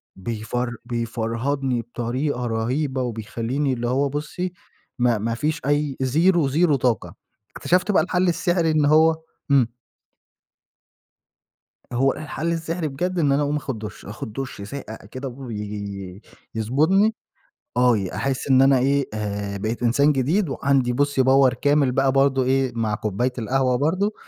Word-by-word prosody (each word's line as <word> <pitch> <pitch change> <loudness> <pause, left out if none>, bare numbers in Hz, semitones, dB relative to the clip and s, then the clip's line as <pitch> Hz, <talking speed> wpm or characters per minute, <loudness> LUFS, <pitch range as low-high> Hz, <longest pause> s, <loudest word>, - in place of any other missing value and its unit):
بيفر 120 +4 -3
بيفرهدني 120 +2 -2
بطريقة 125 +3 -3
رهيبة 130 +4 -1
وبيخلّيني 120 +4 -2
اللي 120 -1 -2
هو 135 +3 +1
بُصّي 155 +5 -4 0.5
ما 120 -2 +3
ما 115 +2 -2
فيش 155 +5 -1
أي 145 -1 0
زيرو، 160 +4 +3
زيرو 155 +2 +3
طاقة. 120 -5 -1 0.4
اكتشفت 180 +3 +1
بقى 160 - +4
الحل 180 0 +1
السحري 170 -1 +1
إن 155 -2 +2
هو 160 +2 +5 0.4
إمم. 130 -5 +5 2.3
هو 135 +3 +2
الحل 155 +2 -3
السحري 165 0 -2
بجد 175 +6 -2
إن 145 -3 +3
أنا 140 +2 +2
أقوم 145 +1 0
آخُد 130 -6 -5
دُش.آخُد 105 0 -8
دُش 135 -5 -5
ساقع 110 +1 -7 0.2
كده 130 +1 -5
وي 105 -6 -6 0.3
يضبطني. 160 - +2 0.6
آه. 125 -2 +5 0.2
أحس 135 0 -2
إن 130 0 +6
أنا 135 -1 +5
إيه، 140 +1 +2
آآ 100 -1 -3
بقيت 110 +4 -3
إنسان 140 +5 +4
جديد، 150 +6 +1
وعندي 135 -3 +1
بُصّي 140 0 +2
power 130 -1 +5
كامل 145 -2 +3
بقى 135 +1 +2
برضه 135 -1 +3
إيه، 130 0 +1
مع 110 -2 0
كوباية 110 +5 -1
القهوة 130 +2 +1
برضه 185 - +1
135 Hz, 140 wpm, -23 LUFS, 120-150 Hz, 2.3 s, إن